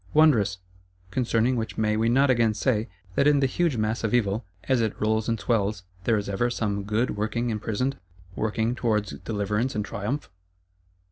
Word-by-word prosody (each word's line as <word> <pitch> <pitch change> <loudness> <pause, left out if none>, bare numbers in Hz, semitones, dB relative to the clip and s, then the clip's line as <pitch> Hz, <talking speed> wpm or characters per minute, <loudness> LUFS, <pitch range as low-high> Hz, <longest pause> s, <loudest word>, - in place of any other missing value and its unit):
Wondrous! 115 -12 +5 0.5
Concerning 120 0 +1
which 110 -2 -3
may 105 -1 +1
we 115 +1 +2
not 135 +3 +4
again 115 -3 +2
say, 110 -1 0 0.2
that 140 - +3
in 145 -1 +5
the 135 - +3
huge 150 0 +1
mass 110 +2 -1
of 110 +2 +1
Evil, 110 -1 +1 0.2
as 130 -3 +2
it 110 -2 -1
rolls 110 +1 +1
and 115 -1 0
swells, 105 -4 0 0.2
there 115 -2 +3
is 100 - -3
ever 100 +5 0
some 100 -4 -2
Good 110 +4 0
working 110 +3 -1
imprisoned; 110 +5 -2 0.4
working 110 +3 0
towards 105 -6 0
deliverance 105 +4 -1
and 105 - -1
triumph? 105 +4 -4
110 Hz, 175 wpm, -26 LUFS, 105-125 Hz, 0.5 s, Wondrous